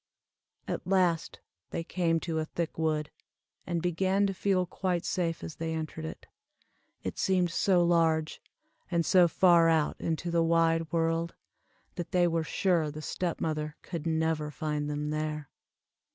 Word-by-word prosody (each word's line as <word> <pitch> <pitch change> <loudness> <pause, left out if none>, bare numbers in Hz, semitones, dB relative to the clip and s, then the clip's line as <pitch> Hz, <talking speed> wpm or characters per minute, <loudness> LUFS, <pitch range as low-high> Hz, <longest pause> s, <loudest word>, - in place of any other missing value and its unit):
At - - -4
last 180 -4 +1 0.3
they 165 - -3
came 165 -1 0
to 165 -2 -2
a 155 - -1
thick 165 +1 -4
wood, 155 -2 -1 0.6
and 170 -2 -1
began 190 +3 +2
to 195 - 0
feel 190 -1 +1
quite 180 0 -2
safe 170 -3 -1
as 160 - -7
they 160 0 -2
entered 160 0 -5
it. 160 - -7 0.8
It - - -4
seemed 180 -2 +2
so 180 0 +3
large, 165 -2 +2 0.5
and 170 -2 +1
so 180 0 +6
far 170 -1 +5
out 160 -2 +1
into 165 +1 -2
the 170 0 +3
wide 165 -1 +2
world, 165 0 0 0.6
that 175 - -5
they 175 -1 +4
were 165 -1 0
sure 165 -1 +1
the 155 +1 -7
step 175 +2 -2
mother 155 -1 -2
could 170 -3 -5
never 160 -1 0
find 150 -1 -3
them 150 0 -2
there. 155 -1 -3
165 Hz, 155 wpm, -29 LUFS, 160-175 Hz, 0.8 s, so